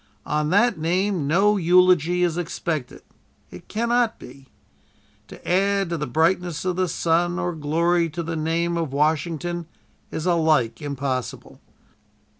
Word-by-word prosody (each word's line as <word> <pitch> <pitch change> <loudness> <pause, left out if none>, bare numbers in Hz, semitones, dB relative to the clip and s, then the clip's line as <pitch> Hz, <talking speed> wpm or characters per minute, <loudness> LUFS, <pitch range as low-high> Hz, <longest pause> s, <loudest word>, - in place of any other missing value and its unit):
On 150 0 -1
that 205 +1 +3
name 180 0 0
no 200 +7 +3
eulogy 180 -1 +3
is 170 -2 +1
expected. 165 -5 -4 0.5
It 90 - -12
cannot 235 +1 0
be. 135 +2 -14 0.8
To - - -13
add 195 +1 +1
to 170 - -1
the 150 - -3
brightness 165 +4 0
of 180 -1 0
the 185 0 0
sun 175 +1 0
or 175 -1 -2
glory 165 +3 +1
to 170 +2 -5
the 165 0 -4
name 165 +2 -1
of 160 -5 -3
Washington 160 +3 -1 0.4
is 160 - -5
alike 155 -10 +2
impossible. 135 -5 -4
170 Hz, 135 wpm, -23 LUFS, 155-180 Hz, 0.8 s, that